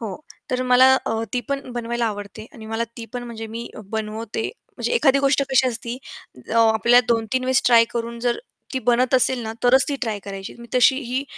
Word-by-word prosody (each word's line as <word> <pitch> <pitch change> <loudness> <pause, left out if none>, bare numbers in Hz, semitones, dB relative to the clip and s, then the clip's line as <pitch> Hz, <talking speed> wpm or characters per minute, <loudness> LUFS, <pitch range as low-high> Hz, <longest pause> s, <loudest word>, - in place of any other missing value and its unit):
हो, 220 -4 -5 0.4
तर 255 0 0
मला 255 +1 +6
अ, 225 0 -1
ती 245 - +1
पण 275 -2 -3
बनवायला 235 0 -2
आवडते 205 +1 -6
आणि 220 -2 -11
मला 225 +1 -2
ती 230 - -7
पण 245 - -4
म्हणजे 225 -2 -7
मी 230 +2 -7 0.2
बनवते. 220 0 -3 0.3
म्हणजे - - -2
एखादी 275 - +4
गोष्ट 275 0 +2
कशी 265 0 +4
असती, 240 0 -4 0.5
अ, - - -2 0.2
आपल्याला 235 +3 +5
2-3 235 +2 0
वेळेस 260 0 +2
ट्राय 230 -2 +7
करून 235 0 -4
जर 240 0 0 0.3
ती 265 - 0
बनत 245 +2 +3
असेल 260 0 +4
ना, 220 0 -4
तरच 260 +2 +5
ती 285 - -1
ट्राय 220 -3 -1
करायची. 195 -1 -7
मी 235 - -11
तशी 255 +2 +5
ही 255 +1 -3
235 Hz, 200 wpm, -22 LUFS, 225-255 Hz, 0.5 s, ट्राय